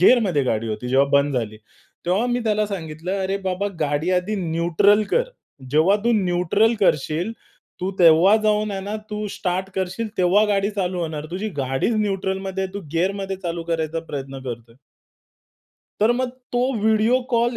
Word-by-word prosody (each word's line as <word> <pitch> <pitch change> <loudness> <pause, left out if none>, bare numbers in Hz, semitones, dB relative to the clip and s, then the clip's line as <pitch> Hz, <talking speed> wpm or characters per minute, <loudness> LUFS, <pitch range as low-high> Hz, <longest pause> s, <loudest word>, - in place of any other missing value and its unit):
गिअरमध्ये 185 - +4
गाडी 115 -2 -1
होती 110 +3 -4
जेव्हा 135 +2 +3
बंद 140 -1 +3
झाली. 110 -3 -2 0.5
तेव्हा 195 +7 +2
मी 245 0 0
त्याला 215 -1 +1
सांगितलं 180 0 -4
"अरे 190 +1 -1
बाबा 185 +2 -1
गाडी 150 +4 0
आधी 205 +4 -4
न्यूट्रल 170 +6 +3
कर. 485 - +3 0.5
जेव्हा 160 +8 +4
तू 235 - +3
न्यूट्रल 180 +6 +2
करशील, 165 +3 +1 0.5
तू 185 - -1
तेव्हा 170 +4 +6
जाऊन 215 0 +2
आहे 195 -1 -3
ना, 205 +2 -5 0.2
तू 210 0 -3
स्टार्ट 185 +1 -2
करशील 190 +5 -2
तेव्हा 185 +4 +4
गाडी 200 0 +1
चालू 185 -3 -2
होणार. 155 -2 -4
तुझी 190 +5 -3
गाडीच 135 - 0
न्यूट्रलमध्ये 190 -2 -1
आहे. 190 - -6
तू 200 - -3
गिअरमध्ये 195 +3 -1
चालू 170 -2 -4
करायचा 160 0 -1
प्रयत्न 135 -1 -5
करतोय." 120 -2 -7 1.3
तर 220 +3 +5
मग 255 +1 -1 0.2
तो 245 - +1 0.2
व्हिडिओ 220 +4 +3
कॉल 235 0 +2
185 Hz, 160 wpm, -22 LUFS, 160-210 Hz, 1.3 s, तेव्हा